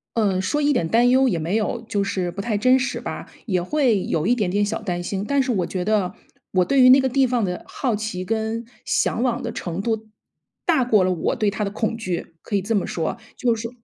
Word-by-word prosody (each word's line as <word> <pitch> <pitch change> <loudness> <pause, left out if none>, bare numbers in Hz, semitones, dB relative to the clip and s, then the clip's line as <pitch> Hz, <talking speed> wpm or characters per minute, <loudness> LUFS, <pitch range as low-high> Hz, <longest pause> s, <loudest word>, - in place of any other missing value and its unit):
嗯， 200 -5 +2
说 295 +11 0
一 290 0 +3
点 165 -9 0
担 240 +2 +4
忧 260 0 +4
也 170 - 0
没 170 +6 -1
有， 225 +2 -1
就 205 -3 0
是 185 -3 -2
不 200 - -5
太 215 0 -1
真 255 +5 +5
实 260 0 -2
吧， - - -6 0.2
也 185 -5 0
会 240 -4 +2
有 160 +2 -1
一 245 - +4
点 205 -6 0
点 205 +1 +2
小 220 +2 -3
担 175 -4 -3
心， 195 +2 -3
但 280 +3 +2
是 255 -2 0
我 185 -4 0
觉 185 -1 -3
得， 210 -4 +1 0.4
我 185 -1 +3
对 275 -1 +3
于 255 - +8
那 265 +2 +8
个 265 - +2
地 265 +1 +3
方 240 -4 +1
的 180 -1 -4
好 245 -6 -2
奇 205 -4 -4
跟 225 +2 -2 0.2
向往 245 +1 0
的 230 -3 -4
程 175 +2 -4
度， 220 0 -2 0.6
大 315 -7 +3
过 215 -6 +3
了 185 - +2
我 170 - -1
对 210 -2 +2
它 205 +1 -3
的 200 - -2
恐 220 +2 -1
惧， 185 -6 -4
可 205 - -1
以 - - 0
这 220 +4 -1
么 200 - +1
说。 165 +6 -2 0.2
就 240 -2 +2
是 230 +1 -5
215 Hz, 270 characters per minute, -22 LUFS, 190-245 Hz, 0.6 s, 于